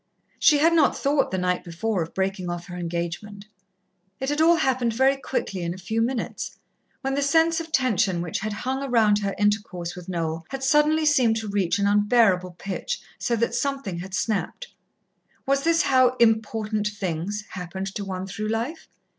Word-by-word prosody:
She 300 Hz, -, +6 dB
had 325 Hz, +3 st, +4 dB
not 320 Hz, -3 st, +3 dB
thought 280 Hz, 0 st, +1 dB
the 190 Hz, -, -2 dB
night 180 Hz, 0 st, 0 dB
before 180 Hz, +3 st, -2 dB
of 165 Hz, -, -6 dB
breaking 190 Hz, -1 st, -1 dB
off 175 Hz, 0 st, -4 dB
her 180 Hz, -, -8 dB
engagement. 175 Hz, +4 st, -4 dB, 0.7 s
It 265 Hz, -, -2 dB
had 295 Hz, +1 st, 0 dB
all 335 Hz, +2 st, +6 dB
happened 260 Hz, -6 st, +1 dB
very 265 Hz, +3 st, +4 dB
quickly 260 Hz, -8 st, -3 dB
in 170 Hz, 0 st, -3 dB
a -, -, -10 dB
few 220 Hz, +4 st, -2 dB
minutes, 240 Hz, +1 st, -3 dB, 0.4 s
when 270 Hz, -1 st, -1 dB
the 280 Hz, -, 0 dB
sense 325 Hz, +4 st, +3 dB
of 325 Hz, -1 st, -7 dB
tension 215 Hz, -, +2 dB
which 170 Hz, -, -3 dB
had 215 Hz, +1 st, -3 dB
hung 260 Hz, +6 st, -3 dB
round 215 Hz, -4 st, +4 dB
her 200 Hz, -1 st, -2 dB
intercourse 205 Hz, -4 st, -1 dB
with 180 Hz, 0 st, -10 dB
Noel 165 Hz, -2 st, -3 dB
had 270 Hz, 0 st, -5 dB
suddenly 300 Hz, +3 st, +3 dB
seemed 260 Hz, -7 st, +4 dB
to 220 Hz, -1 st, -3 dB
reach 200 Hz, -3 st, 0 dB
an 200 Hz, -, +1 dB
unbearable 205 Hz, -3 st, +3 dB
pitch, 340 Hz, -, -4 dB, 0.2 s
so 235 Hz, -, 0 dB
that 235 Hz, +1 st, 0 dB
something 275 Hz, -11 st, -2 dB
had 190 Hz, +2 st, -6 dB
snapped. 225 Hz, -, -2 dB, 0.8 s
Was 275 Hz, +1 st, +2 dB
this 330 Hz, 0 st, +3 dB
how 255 Hz, -2 st, +4 dB
Important 220 Hz, -2 st, +1 dB
Things 205 Hz, 0 st, -3 dB
happened 190 Hz, +1 st, -5 dB
to 205 Hz, -, -4 dB
one 190 Hz, -1 st, -4 dB
through 200 Hz, +3 st, -4 dB
life? 230 Hz, +9 st, -3 dB
215 Hz, 180 wpm, -24 LUFS, 185-265 Hz, 0.8 s, She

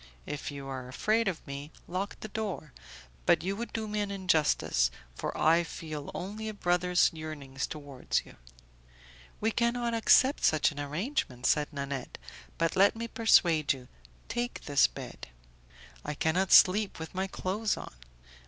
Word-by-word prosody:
If 145 Hz, -, -5 dB
you 140 Hz, -1 st, -7 dB
are 130 Hz, -2 st, -5 dB
afraid 215 Hz, -, +1 dB
of 185 Hz, -4 st, -3 dB
me, 140 Hz, +2 st, -7 dB, 0.2 s
lock 190 Hz, +3 st, -4 dB
the -, -, -5 dB
door, 200 Hz, -9 st, -4 dB, 0.5 s
but -, -, +4 dB
you 195 Hz, +2 st, -1 dB
would 235 Hz, +3 st, -5 dB
do 220 Hz, -1 st, -3 dB
me 210 Hz, 0 st, -2 dB
an 205 Hz, -1 st, -1 dB
injustice, 185 Hz, -6 st, +2 dB, 0.2 s
for -, -, -4 dB
I 165 Hz, +2 st, +5 dB
feel 155 Hz, -3 st, -7 dB
only 210 Hz, +4 st, -4 dB
a 215 Hz, -, -7 dB
brother's 180 Hz, -1 st, +3 dB
yearnings 145 Hz, -4 st, -5 dB
towards 145 Hz, -4 st, -3 dB
you." -, -, -14 dB, 1.0 s
"We 220 Hz, +1 st, +1 dB
cannot 235 Hz, +1 st, 0 dB
accept 260 Hz, +4 st, +4 dB
such 155 Hz, -1 st, +4 dB
an 145 Hz, -, -8 dB
arrangement," 145 Hz, -, -2 dB
said 150 Hz, 0 st, +2 dB
Nanette, 140 Hz, -3 st, -5 dB, 0.4 s
"but 165 Hz, 0 st, 0 dB
let 200 Hz, +3 st, +5 dB
me 230 Hz, +1 st, -4 dB
persuade 170 Hz, -, +4 dB
you; 130 Hz, -2 st, -11 dB, 0.4 s
take 240 Hz, +1 st, -3 dB
this 140 Hz, -3 st, +4 dB
bed." -, -, -9 dB, 0.8 s
"I 150 Hz, -, -4 dB
cannot 175 Hz, +5 st, +1 dB
sleep 200 Hz, +2 st, +6 dB
with 160 Hz, 0 st, -7 dB
my 190 Hz, +1 st, -1 dB
clothes 200 Hz, +3 st, -1 dB
on." -, -, -8 dB
175 Hz, 155 wpm, -30 LUFS, 145-210 Hz, 1.0 s, sleep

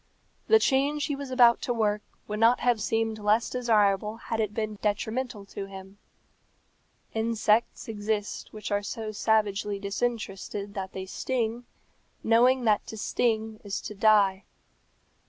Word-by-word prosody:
The 445 Hz, -, +7 dB
change 285 Hz, -4 st, +1 dB
he 290 Hz, -, -2 dB
was 280 Hz, -1 st, -7 dB
about 245 Hz, -2 st, +5 dB
to 245 Hz, -, -1 dB
work 210 Hz, -2 st, +1 dB, 0.3 s
would 210 Hz, 0 st, -4 dB
not 230 Hz, +2 st, +4 dB
have 240 Hz, -3 st, +2 dB
seemed 225 Hz, +1 st, -1 dB
less 210 Hz, +2 st, +2 dB
desirable 215 Hz, -3 st, +2 dB
had 225 Hz, 0 st, -4 dB
it 215 Hz, -2 st, 0 dB
been 215 Hz, -1 st, -4 dB
detrimental 220 Hz, +1 st, -2 dB
to 195 Hz, -, -5 dB
him. 195 Hz, +1 st, -11 dB, 1.1 s
Insects 225 Hz, 0 st, +1 dB
exist 210 Hz, -1 st, -3 dB
which 215 Hz, -1 st, -7 dB
are 205 Hz, 0 st, +1 dB
so 215 Hz, +1 st, -5 dB
savagely 210 Hz, -1 st, +1 dB
disinterested 200 Hz, -1 st, -3 dB
that 190 Hz, -2 st, -5 dB
they 190 Hz, 0 st, -5 dB
sting, 235 Hz, +3 st, -2 dB, 0.6 s
knowing 245 Hz, +3 st, +4 dB
that 215 Hz, -2 st, +3 dB
to 220 Hz, -, -7 dB
sting 220 Hz, 0 st, -1 dB
is 200 Hz, -1 st, -3 dB
to -, -, -6 dB
die. 200 Hz, -2 st, +3 dB
220 Hz, 140 wpm, -27 LUFS, 205-235 Hz, 1.1 s, The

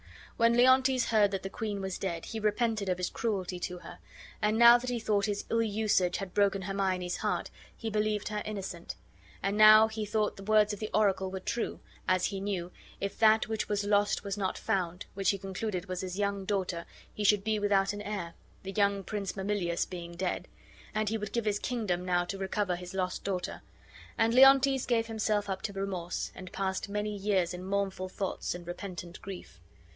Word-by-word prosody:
When 230 Hz, 0 st, +4 dB
Leontes 260 Hz, 0 st, +4 dB
heard 215 Hz, -3 st, +4 dB
that 195 Hz, -2 st, -3 dB
the 195 Hz, -, -4 dB
queen 215 Hz, -3 st, -3 dB
was 190 Hz, -1 st, -4 dB
dead 170 Hz, -4 st, -3 dB
he 225 Hz, -, -5 dB
repented 215 Hz, -1 st, 0 dB
of 180 Hz, -, +1 dB
his 180 Hz, -, -2 dB
cruelty 190 Hz, -5 st, -2 dB
to 180 Hz, 0 st, -4 dB
her; -, -, -11 dB, 0.4 s
and 210 Hz, +1 st, +2 dB
now 235 Hz, +1 st, +9 dB
that 250 Hz, +1 st, -4 dB
he 245 Hz, -1 st, -1 dB
thought 210 Hz, -2 st, +1 dB
his 205 Hz, -1 st, -2 dB
ill 230 Hz, -, +3 dB
usage 205 Hz, -5 st, +1 dB
had 195 Hz, -2 st, -6 dB
broken 200 Hz, -1 st, +2 dB
Hermione's 185 Hz, -2 st, -1 dB
heart, -, -, -2 dB, 0.3 s
he 225 Hz, -1 st, -4 dB
believed 210 Hz, -1 st, 0 dB
her 210 Hz, -1 st, -2 dB
innocent; 195 Hz, -5 st, -5 dB, 0.5 s
and 195 Hz, +1 st, 0 dB
now 215 Hz, +1 st, +8 dB
he 220 Hz, 0 st, -4 dB
thought 210 Hz, 0 st, -1 dB
the 195 Hz, -, -9 dB
words 215 Hz, 0 st, +4 dB
of 205 Hz, -, -6 dB
the 215 Hz, -, -4 dB
oracle 190 Hz, -3 st, +2 dB
were 190 Hz, 0 st, -5 dB
true, 230 Hz, +5 st, -3 dB, 0.3 s
as 185 Hz, 0 st, +3 dB
he 195 Hz, -1 st, -3 dB
knew 185 Hz, -3 st, -3 dB, 0.3 s
"if 200 Hz, 0 st, -4 dB
that 220 Hz, 0 st, +5 dB
which 220 Hz, -1 st, -2 dB
was 205 Hz, -1 st, 0 dB
lost 205 Hz, 0 st, +2 dB
was 200 Hz, -1 st, -3 dB
not 190 Hz, -2 st, -1 dB
found," 180 Hz, -1 st, -2 dB
which 195 Hz, -1 st, 0 dB
he 200 Hz, -, +2 dB
concluded 195 Hz, 0 st, -4 dB
was 185 Hz, -1 st, -4 dB
his 185 Hz, 0 st, -5 dB
young 200 Hz, -1 st, -1 dB
daughter, 185 Hz, -4 st, -2 dB, 0.3 s
he 210 Hz, -, -4 dB
should 205 Hz, -1 st, +4 dB
be 215 Hz, 0 st, 0 dB
without 200 Hz, -1 st, +2 dB
an 205 Hz, -, -6 dB
heir, 200 Hz, -5 st, -4 dB, 0.3 s
the 195 Hz, -, -5 dB
young 200 Hz, 0 st, +1 dB
Prince 200 Hz, 0 st, -3 dB
Mamillius 190 Hz, -3 st, 0 dB
being 175 Hz, -2 st, -7 dB
dead; 180 Hz, +1 st, -2 dB, 0.5 s
and 215 Hz, -1 st, +1 dB
he 225 Hz, -, 0 dB
would 210 Hz, -1 st, -5 dB
give 235 Hz, -2 st, 0 dB
his 205 Hz, -1 st, +1 dB
kingdom 210 Hz, -8 st, -1 dB
now 175 Hz, -1 st, +1 dB
to 195 Hz, +2 st, -5 dB
recover 195 Hz, -1 st, -1 dB
his 180 Hz, +1 st, -8 dB
lost 185 Hz, -1 st, -2 dB
daughter. 185 Hz, -2 st, -3 dB, 0.6 s
And 225 Hz, 0 st, +3 dB
Leontes 270 Hz, 0 st, +6 dB
gave 230 Hz, -2 st, +2 dB
himself 215 Hz, -2 st, 0 dB
up 190 Hz, -1 st, -3 dB
to 200 Hz, -, -4 dB
remorse 190 Hz, -3 st, -3 dB
and 185 Hz, 0 st, -10 dB
passed 190 Hz, +1 st, -2 dB
many 210 Hz, +1 st, -2 dB
years 190 Hz, -3 st, +1 dB
in 180 Hz, +1 st, -6 dB
mournful 195 Hz, -1 st, -2 dB
thoughts 190 Hz, -1 st, -3 dB
and 175 Hz, 0 st, -9 dB
repentant 175 Hz, 0 st, -7 dB
grief. 185 Hz, -, -9 dB
200 Hz, 200 wpm, -30 LUFS, 185-215 Hz, 0.6 s, now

